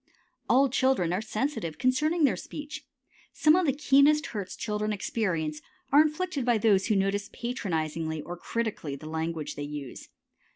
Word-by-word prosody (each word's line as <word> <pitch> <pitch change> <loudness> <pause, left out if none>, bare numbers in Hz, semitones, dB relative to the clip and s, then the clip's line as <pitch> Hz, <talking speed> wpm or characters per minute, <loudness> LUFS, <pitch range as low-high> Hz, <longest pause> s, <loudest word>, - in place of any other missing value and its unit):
All 270 +2 +5
children 260 -9 +1
are 185 - 0
sensitive 215 - -3
concerning 300 +6 +1
their 275 - +4
speech. 295 -1 -8 0.5
Some 305 +1 +5
of 365 -2 +2
the - - +4
keenest 285 +2 +4
hurts 200 -4 -4
children 210 -1 -2
experience 170 -7 -2 0.3
are 290 +2 +8
inflicted 310 -2 -1
by 240 -1 +3
those 205 -3 +3
who 215 - +2
notice 195 +1 0
patronizingly 160 -9 -3
or 175 +3 -6
critically 205 -7 -3
the 140 - -11
language 160 -1 -3
they - - -7
use. 145 -2 -7
215 Hz, 155 wpm, -28 LUFS, 165-275 Hz, 0.5 s, are